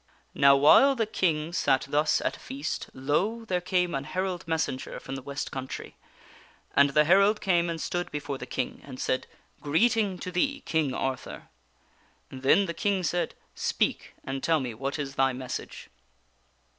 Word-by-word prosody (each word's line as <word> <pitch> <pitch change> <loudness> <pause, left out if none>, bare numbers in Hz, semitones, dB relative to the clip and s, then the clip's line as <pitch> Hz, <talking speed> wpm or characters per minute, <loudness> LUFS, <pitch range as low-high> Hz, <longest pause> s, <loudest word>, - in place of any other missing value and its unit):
Now 140 0 +6
while 210 - +6
the 225 -3 +1
King 165 -6 0
sat 135 -5 +2
thus 150 +2 +2
at - - -1
feast, 140 +3 -5
lo! 185 - -1
there 180 -4 -1
came 180 -1 0
an 135 0 -2
herald 185 +1 -3
messenger 160 -5 -2
from 135 - -8
the 135 - -5
west 140 +2 -5
country. 130 -1 -6 0.8
And 140 0 +6
the 150 +2 +4
herald 195 +6 +4
came 175 -3 +2
and 165 -1 -3
stood 175 +2 -2
before 145 -2 -4
the 125 - -7
King, 130 -1 -3
and 130 -2 -10
said: 130 - -1 0.2
" - - -37
Greeting 205 +5 +2
to 180 - -6
thee, 275 +11 0
King 155 -5 0
Arthur! 135 -1 -4 0.4
" - - -36
Then 135 +9 +3
the 170 - -4
King 195 0 0
said: 175 +1 -1 0.2
"Speak, - - -1
and 135 0 -4
tell 160 +1 +2
me, 125 -4 -4
what 135 +6 -3
is 140 -2 -4
thy 135 -1 +2
message 130 0 -7
155 Hz, 170 wpm, -27 LUFS, 135-185 Hz, 0.8 s, Now